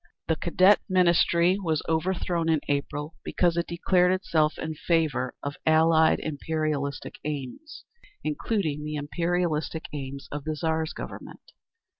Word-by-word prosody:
The 160 - +2
Cadet 185 +3 +4
Ministry 180 0 +4
was 160 -4 0
overthrown 170 0 0
in 160 -2 +3
April 145 +2 -2
because 175 -2 +1
it 170 0 -1
declared 180 +1 +2
itself 160 -5 +1
in 160 0 -4
favour 155 -5 0
of 145 0 -4
Allied 160 0 +4
imperialistic 150 -2 -3
aims, 150 - -6 0.4
including 155 -1 -1
the 150 0 -4
imperialistic 160 +1 -1
aims 140 -1 -6
of 145 0 -4
the 155 +1 -2
Tsar's 160 0 -1
Government. - - -9
160 Hz, 125 wpm, -26 LUFS, 150-170 Hz, 0.4 s, Cadet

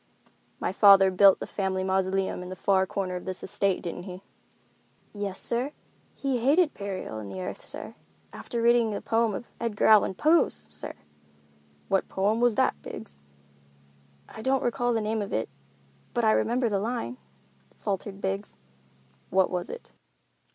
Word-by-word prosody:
"My - - -1
father 195 -1 +7
built 195 +1 +6
a - - -2
family 190 -2 -2
mausoleum 190 0 0
in 180 - -7
the 185 - -6
far 190 0 +2
corner 185 -2 -3
of 180 - -6
this 185 -1 -4
estate, 200 -1 0
didn't 175 0 -5
he?" 180 +1 -9 0.9
"Yes, 200 -2 -3
sir—he 265 +1 -2
hated 300 +7 +3
burial 195 - -5
in 105 -2 -7
the 95 -1 -6
earth, 90 - -5
sir, - - -8 0.4
after 235 -1 -4
reading 235 -2 +4
a - - -4
poem 225 -2 +1
of 235 - -6
Edgar 230 -3 -1
Allan 210 -3 +5
Poe's, 300 - +2
sir!" 75 0 -7 0.9
"What 195 - +1
poem 210 +4 +1
was 245 -3 +3
that, 70 - +1
Biggs?" 70 0 -9 1.1
"I - - -10
don't 265 +2 +1
recall 245 0 0
the 225 -2 +1
name 215 +1 -1
of 200 - -5
it, 110 - -1 0.7
but 240 - +2
I 215 - +5
remember 240 +3 +1
the 205 -3 0
line," 200 - -3 0.6
faltered 195 - -4
Biggs. 195 +2 -3 0.7
"What 190 0 +2
was 180 -1 -2
it?" 485 - -9
200 Hz, 160 wpm, -27 LUFS, 185-230 Hz, 1.1 s, father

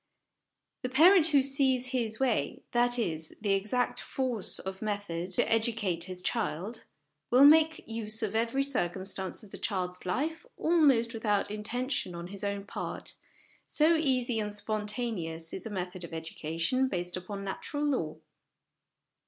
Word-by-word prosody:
The 255 - -2
parent 325 +6 +7
who 285 -4 +4
sees 265 -2 +2
his 235 -4 -1
way 240 - 0
that 245 0 +3
is, 160 -8 -2
the 205 -2 +1
exact 215 +6 0
force 250 -6 -2
of 190 0 -6
method 205 -5 -3
to - - +3
educate 220 -7 +1
his 185 -1 -3
child, 215 0 -2 0.4
will 255 +3 +7
make 315 +1 +5
use 225 -1 -2
of 210 -1 -1
every 230 +5 +1
circumstance 190 -6 -2
of 205 - -14
the - - -8
child's 180 -3 -2
life 300 - -2
almost 275 -9 +3
without 210 -2 0
intention 215 -2 -2
on 170 +1 -7
his 200 +1 -7
own 200 0 -2
part, - - -6 0.5
so 315 +2 +4
easy 255 -7 +1
and 210 -1 -2
spontaneous 210 -6 -1
is 210 - -3
a - - -6
method 185 -2 -5
of 170 - -7
educa 160 0 -6
tion 255 +10 +3
based 180 -5 -3
upon 195 +2 -6
Natural 290 +9 -4
Law. 245 - -1
215 Hz, 150 wpm, -30 LUFS, 185-255 Hz, 0.5 s, parent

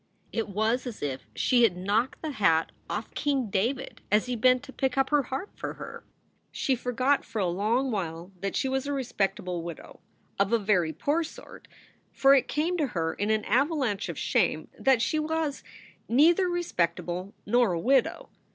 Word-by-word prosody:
It 225 -2 -2
was 220 +6 0
as 230 -9 -7
if 135 -2 -4
she 245 -1 +3
had 205 -7 +4
knocked 210 - 0
the 310 - -2
hat 165 - +2 0.2
off 215 +1 -4
King 270 -7 0
David 245 +8 -1
as 210 +1 +4
he 250 0 -2
bent 255 +3 +3
to 270 -2 -11
pick 265 -1 -1
up 270 +1 +2
her 295 -1 +5
harp 270 - -5
for - - -5
her. - - -9 0.5
She 270 - 0
forgot 255 +3 +1
for 230 - -8
a 200 - +2
long 215 +9 +1
while 175 -3 -4
that 195 0 -2
she - - +1
was 265 +1 -1
a 285 - -1
respectable 195 -9 -2
widow 170 -1 -9 0.4
of 200 +1 +2
a 235 - +5
very 195 -6 +1
poor 295 - 0
sort, 320 - -11 0.4
for 275 0 +5
it 270 - +4
came 330 +5 0
to 300 -4 +1
her 165 -8 -2
in 205 +1 -2
an 215 -1 +1
avalanche 255 - +1
of - - -5
shame - - +1
that 260 -3 +3
she 310 - +1
was 310 -2 -2 0.5
neither 335 +9 +5
respectable 180 - -2
nor 235 -2 +3
a 170 - -1
widow. 265 +9 +1
240 Hz, 185 wpm, -28 LUFS, 195-275 Hz, 0.5 s, her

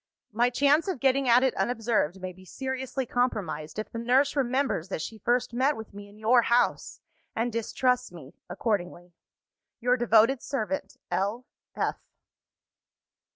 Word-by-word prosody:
My 235 +3 +2
chance 285 +7 +3
of 370 -9 -2
getting 270 0 +2
at 245 +2 +6
it 265 - +2
unobserved 225 -7 0
may 185 0 -6
be 185 +1 -16
seriously 265 +5 -4
compromised, 210 -12 -2
if 215 - -5
the 230 - -5
nurse 260 +5 +2
remembers 260 - 0
that - - -3
she 220 - -7
first 240 +1 0
met 265 +4 +1
with 220 -2 -9
me 205 0 -10
in 205 - -17
your 230 +3 +4
house, 235 +1 +1 0.3
and 230 +1 -1
distrusts 250 +2 0
me 155 -6 -12 0.2
accordingly. 175 -5 -3 0.7
Your 250 +1 +2
devoted 235 +2 +4
servant, 280 +1 -3
L. 210 +6 -1
240 Hz, 145 wpm, -27 LUFS, 210-255 Hz, 0.7 s, at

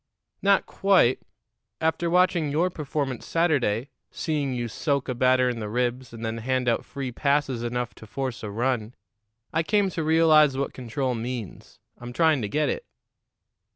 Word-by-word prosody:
"Not 200 -1 +3
quite. 190 -11 +3 0.6
After 160 +1 0
watching 180 -3 +3
your 165 +6 +1
performance 140 -5 -3
Saturday 140 -8 +1 0.2
seeing 145 -4 -2
you 120 -2 -2
soak 140 +4 -1
a 130 - -1
batter 130 +1 +3
in 120 -2 -2
the 105 -1 -4
ribs, 125 +2 -1
and 115 0 -7
then 115 0 -3
hand 130 +2 -1
out 115 - +1
free 135 -3 -5
passes 140 -1 0
enough 120 0 -3
to 110 - -14
force 130 +1 -4
a 105 - -5
run 120 +1 -1 0.6
I 165 - +2
came 200 +2 +1
to 165 - -3
realize 155 -3 +5
what 140 - -2
control 130 +1 -2
means. 115 -3 -6 0.2
I'm 120 0 -8
trying 160 -2 +3
to 105 - -3
get 150 +7 +1
it." 485 - -2
130 Hz, 165 wpm, -25 LUFS, 120-155 Hz, 0.6 s, realize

